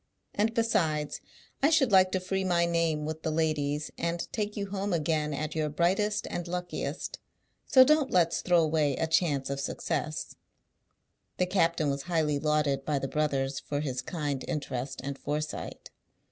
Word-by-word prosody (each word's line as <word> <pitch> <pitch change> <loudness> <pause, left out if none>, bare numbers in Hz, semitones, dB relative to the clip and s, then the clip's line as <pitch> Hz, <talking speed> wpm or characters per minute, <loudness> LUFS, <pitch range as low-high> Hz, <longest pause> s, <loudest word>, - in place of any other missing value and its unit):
And 220 +2 +1
besides, 160 -10 0 0.4
I 280 - +5
should 300 -7 +3
like 185 -1 +6
to 185 - +2
free 190 +1 -2
my 175 -2 +2
name 165 -3 0
with 160 +1 -4
the 160 - -1
ladies, 155 -2 0
and 170 0 -1
take 210 -1 -2
you 200 -1 -3
home 200 -1 -1
again 155 -2 0
at 150 +2 -3
your 155 -1 0
brightest 190 +7 +1
and 175 0 -3
luckiest; 180 0 -4 0.5
so 260 - +8
don't 300 0 +3
let's 170 -2 +2
throw 175 -2 +4
away 155 -3 +1
a 160 - 0
chance 150 -5 +1
of 140 - -2
success." 155 +2 -3 1.0
The 180 - +2
captain 170 -5 +2
was 140 0 -2
highly 155 -3 0
lauded 150 -2 +1
by 150 0 0
the 135 - -2
brothers 135 -2 0
for 145 0 -3
his 130 -4 -2
kind 145 -2 -3
interest 135 -2 -3
and 140 0 -5
foresight. 150 +1 -4
160 Hz, 165 wpm, -29 LUFS, 145-180 Hz, 1.0 s, so